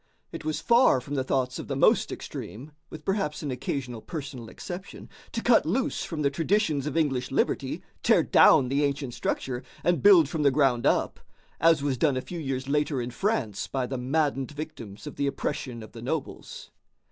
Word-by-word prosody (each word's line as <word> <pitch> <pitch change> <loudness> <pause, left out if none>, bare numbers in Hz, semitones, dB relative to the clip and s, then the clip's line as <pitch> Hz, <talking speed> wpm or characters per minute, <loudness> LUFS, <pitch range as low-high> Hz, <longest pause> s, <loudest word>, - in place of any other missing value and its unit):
It - - -7
was 155 0 -2
far 235 - +4
from 140 +3 -8
the 135 -2 0
thoughts 130 -1 -1
of - - -7
the - - -2
most - - +3
extreme, 130 +8 -7 0.2
with 155 -1 -10
perhaps 195 -7 -1
an 145 - -2
occasional 125 -2 -4
personal 135 -8 -7
exception, 185 +2 -8 0.2
to 230 - -3
cut 235 -2 +5
loose 220 +12 -1
from 155 -3 -4
the 140 - +2
traditions 160 -2 +1
of 150 - -2
English 135 -5 0
liberty, - - -1 0.2
tear - - +4
down 125 - +6
the 140 +2 +1
ancient 140 -3 -2
structure, 125 +1 -2 0.2
and 175 0 +2
build 185 -7 +7
from 155 +2 -3
the 145 - +5
ground 130 -4 +2
up, - - +1 0.4
as 165 -2 +4
was 135 -4 -1
done 140 -3 +2
a - - -1
few 175 +5 -7
years 135 -3 -3
later 145 -1 0
in 120 0 -4
France 130 - -1
by 130 -2 -2
the 130 0 -4
maddened 135 0 0
victims 145 -8 -8
of 150 - -8
the 140 - 0
oppression 130 -4 -3
of 110 - -12
the 115 - -10
nobles. 140 +5 -5
140 Hz, 195 wpm, -27 LUFS, 130-160 Hz, 0.4 s, build